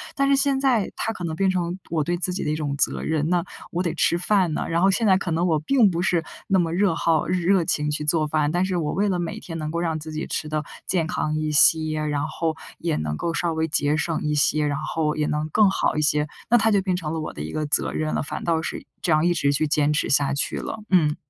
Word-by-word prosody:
但 275 -1 +2
是 280 - +5
现 275 -1 +2
在 255 -7 +2
它 225 - -2
可 180 - -8
能 160 -1 -3
变 195 +3 +1
成 180 -1 -1
我 160 -3 0
对 175 +4 -1
自 180 +1 -2
己 185 - -3
的 150 - -1
一 155 - 0
种 145 -2 -2
责 - - 0
任， 155 0 -1
那 175 -1 +2 0.3
我 175 - -1
得 170 - -1
吃 170 - +2
饭 180 -2 +1
呢， - - -2
然 165 +1 +1
后 195 +1 +5
现 225 +3 +1
在 190 -2 +5
可 185 -2 -4
能 165 +2 +1
我 160 -3 +2
并 230 - +4
不 170 -1 -2
是 175 -2 +1 0.2
那 195 -3 +3
么 165 -2 0
热 190 0 +2
好 165 -2 +1
热 180 +1 +2
情 150 -1 0
去 150 0 -2
做 155 0 +2
饭。 150 -1 +1
但 175 +2 +1
是 190 -1 -2
我 155 -3 -1
为 205 +2 +1
了 185 - 0
每 170 -1 -4
天 165 -2 -7
能 155 -1 -4
够 170 - -2
让 165 -2 -1
自 155 +1 -8
己 155 +1 -4
吃 155 - -3
得 155 0 -1 0.2
健 170 -4 0
康 155 -1 -2
一 155 0 -1
些， 155 +1 +4
然 145 0 -1
后 160 0 -2 0.2
也 165 -2 -1
能 75 -1 -2
够 170 - -2
稍 165 +1 -1
微 160 0 0
节 145 0 +1
省 165 0 -1
一 150 0 0
些， 150 +1 +2
然 145 -1 -1
后 155 0 -1
也 150 - 0
能 150 +1 -2
更 210 +5 +4
好 190 - 0
一 155 - 0
些 150 0 +1 0.2
那 240 - +6
它 225 0 +3
就 205 - +4
变 185 -1 0
成 165 -4 -4
了 165 - -2
我 155 - -5
的 - - -7
一 75 - -5
个 155 - -2
责 145 - 0
任 155 0 -2
了。 - - 0
反 145 - -5
倒 165 -1 +1
是 - - -5 0.2
这 170 - 0
样， 155 +1 +3
一 175 - +3
直 140 -4 +1
去 150 +2 +1
坚 150 0 +2
持 150 - 0
下 140 0 +2
去 140 - -2
了。 220 - -5
嗯。 155 -5 +3
160 Hz, 300 characters per minute, -23 LUFS, 150-180 Hz, 0.3 s, 那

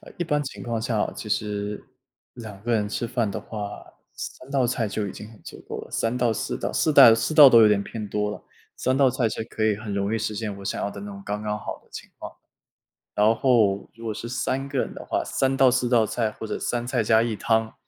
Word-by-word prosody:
呃， - - -13
一 175 - -1
般 150 -2 0
情 135 - -7
况 115 -2 -2
下 115 -3 -1
哦， - - 0
其 105 - -7
实 105 0 -2 0.5
2 110 -5 -9
个 120 +1 -1
人 105 -2 +1
吃 115 +3 -3
饭 115 -3 -1
的 105 - -4
话， 105 -2 -7 0.3
3 130 - -8
道 135 -3 +2
菜 115 -2 -1
就 100 0 -2
已 - - -6
经 105 - -10
很 110 - -17
足 - - -10
够 - - -5
了， - - -12
3 115 +2 -1
道、 120 -2 +2
4 110 - -3
道 - - -3
4 155 - +1
带 120 -6 +9
4 135 +7 -1
道 145 -3 +10
都 115 -2 +8
有 105 - +7
点 100 -1 +2
偏 105 0 -6
多 105 0 -1
了， - - -8 0.3
3 130 +1 0
道 135 -2 +4
菜 120 -3 0
其 110 - -6
实 - - -2
可 110 -1 -3
以 110 -2 +2
很 105 -1 -6
容 100 +2 -1
易 - - 0
实 110 0 -2
现 105 -2 -4
我 100 - -10
想 - - -2
要 100 - -2
的 100 - -9
那 100 - -7
种 100 - -9
刚 105 +1 -3
刚 105 0 -2
好 - - -6
的 - - -30
情 - - -9
况。 - - -8 0.8
然 105 +2 +4
后 110 -7 +2
如 115 0 -12
果 110 -2 -3
是 115 - -6
3 130 +2 -2
个 140 -2 -3
人 - - -2
的 - - -9
话， - - -1
3 135 0 0
道、 135 -1 +6
4 125 0 +1
道 115 -3 +4
菜 110 -1 -1
或 110 - -7
者 - - -3
3 120 0 -2
菜 125 -3 0
加 110 +1 +4
1 115 -2 -1
汤， 110 0 0
115 Hz, 250 characters per minute, -24 LUFS, 105-125 Hz, 0.8 s, 道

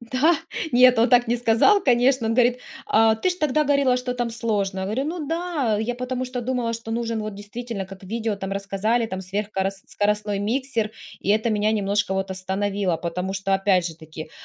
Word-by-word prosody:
Да! 255 +8 +2 0.4
Нет, 250 0 +6
он 230 +2 +4
так 245 0 +4
не 240 - +2
сказал, 240 - +4
конечно. 250 -2 +3
Он 225 - +1
говорит: 245 0 +3 0.3
"Э, 220 0 +5
ты 370 - +3
же 360 - -3
тогда 300 -1 +2
говорила, 280 -3 +3
что 250 0 -3
там 240 -1 -2
сложно". 210 -4 -1
Я - - -2
говорю: 220 +8 -1
"Ну 315 0 -4
да, 325 -8 -1
я 235 +2 -2
потому 250 +1 -3
что 250 0 -4
думала, 245 -1 -1
что 230 0 -6
нужен 230 -1 -2
вот 215 -1 -5
действительно, 205 +1 -6
как 195 0 -12
в - - -11
видео 225 +1 -2
там 195 -1 -5
рассказали, 200 +4 0
там 190 -3 -5
сверх 200 +3 -4
корос 195 0 -2
скоростной 210 0 0
миксер, 230 0 -1 0.3
и - - -6
это 220 +2 +2
меня 210 0 +1
немножко 200 -2 0
вот 190 0 -2
остановило, 190 0 -1
потому 180 +3 -3
что, 195 0 0
опять 195 -2 +2
же 165 - -6
таки, 155 -1 -10
225 Hz, 210 wpm, -23 LUFS, 195-250 Hz, 0.4 s, Нет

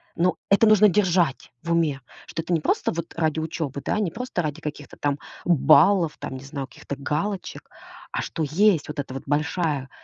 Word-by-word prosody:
Но 180 +2 +2
это 200 +3 +5
нужно 215 -1 +7
держать 180 -7 +1
в 170 - -3
уме, 160 -5 +1 0.3
что 165 - -4
это 175 - -2
не 165 - +2
просто - - +1
вот 170 0 -5
ради 160 -1 +1
учебы. 155 -3 -4
Да, - - 0
не 195 -6 0
просто 250 -2 -3
ради 155 +1 -4
каких-то 150 -1 -7
там 145 -1 0 0.3
баллов, 165 +1 +5
там, - - -5
не 130 - -11
знаю, 135 -1 -5
каких-то 140 - -8
галочек, 165 +8 -3 0.4
а - - -2
что 160 - -3
есть 180 +2 +3
вот 150 0 -5
эта 135 -2 -4
вот 135 - -5
большая 150 -2 0
160 Hz, 190 wpm, -24 LUFS, 145-180 Hz, 0.4 s, нужно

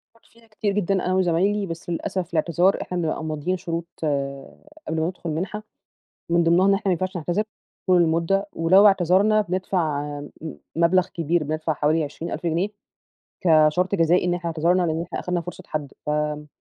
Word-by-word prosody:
فكرت 230 - -27
فيها 230 0 -23
كتير 215 -2 -2
جدًا 200 -1 0
أنا 185 - +1
وزمايلي، 190 +3 +2
بس 165 -1 -7
للأسف 175 +1 -3
الإعتذار 170 +3 +2
إحنا 180 - -4
بنبقى 160 -2 -2
ماضيين 155 +4 -2
شروط 170 -1 -4 1.0
قبل 160 0 -1
ما 160 - +1
ندخل 180 -1 -5
المنحة، 185 +7 -3 0.7
من 170 0 +4
ضمنهم 185 +4 +4
إحنا 195 - -2
ما - - +4
ينفعش 185 +2 -2
نعتذر 175 +5 -1 0.4
طول 180 -2 +5
المدة، 170 +5 +1
ولو 185 +5 +5
اعتذرنا 195 +3 +4
بندفع 180 -6 -1 0.2
م 145 - -9 0.5
مبلغ 175 +2 +3
كبير 165 0 -1
بندفع 155 +1 -1
حوالي 155 +2 +1
20.000 150 +3 -6
جنيه 170 +5 +1 0.8
كشرط 165 +3 +4
جزائي 170 +1 +3
إن 175 - +1
إحنا 175 -1 -3
اعتذرنا، 170 +3 +2
لإن 160 -1 -1
إحنا 175 - -5
أخدنا 180 -1 -2
فرصة 180 +2 -9
حد، 150 -3 -4
ف - - -3
آمم، 150 0 -1
175 Hz, 170 wpm, -23 LUFS, 160-185 Hz, 1.0 s, طول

